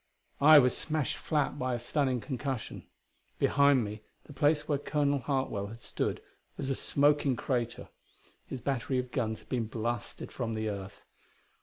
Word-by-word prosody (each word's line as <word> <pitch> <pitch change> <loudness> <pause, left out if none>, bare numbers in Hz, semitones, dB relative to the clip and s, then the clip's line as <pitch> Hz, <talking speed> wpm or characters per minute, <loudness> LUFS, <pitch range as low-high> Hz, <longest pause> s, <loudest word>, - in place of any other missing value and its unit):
I 155 +2 +9
was 125 -3 +5
smashed 155 -2 -1
flat 145 -2 -1
by 130 -1 0
a - - -3
stunning 130 0 0
concussion. 130 +1 -4 0.5
Behind 140 -3 +4
me 105 0 -6 0.2
the - - -12
place 150 +2 +2
where 145 -2 +1
Colonel 145 -1 +1
Hartwell 130 -7 -1
had 110 +3 -9
stood - - -3 0.3
was 135 - -2
a - - +1
smoking 145 -1 +2
crater; 120 -1 -2 0.6
his 130 - -6
battery 130 0 -1
of 125 0 -2
guns 110 -5 -2
had - - -23
been 120 -4 -1
blasted 115 0 -4
from 115 -2 -3
the 110 0 -1
earth. 100 -1 -7
130 Hz, 160 wpm, -30 LUFS, 115-145 Hz, 0.6 s, I